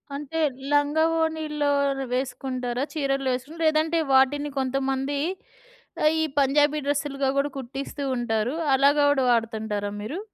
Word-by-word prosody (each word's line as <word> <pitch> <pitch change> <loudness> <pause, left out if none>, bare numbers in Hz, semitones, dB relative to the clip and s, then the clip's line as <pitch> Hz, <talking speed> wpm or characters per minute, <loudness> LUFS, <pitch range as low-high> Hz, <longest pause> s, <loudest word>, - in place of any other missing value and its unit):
అంటే 295 +3 -4 0.3
లంగావోణీల్లో 315 0 +1 0.4
వేసుకుంటారా? 255 -1 -2
చీరలేసున్ 275 0 -2
లేదంటే 315 +1 +2
వాటిని 285 +2 +3
కొంతమంది, 270 +1 -1 0.9
ఆహ్, 305 - +6
ఈ - - +2 0.2
పంజాబీ 290 +2 +3
డ్రెస్‌లుగా 280 -1 0
కూడా 285 +1 0
కుట్టిస్తూ 270 +2 -5
ఉంటారు. 235 +2 -1 0.2
అలాగా 285 +2 +4
కూడా 270 -2 +1
వాడుతుంటారా 220 -3 -1
మీరు? 275 - -5
275 Hz, 105 wpm, -25 LUFS, 255-295 Hz, 0.9 s, ఆహ్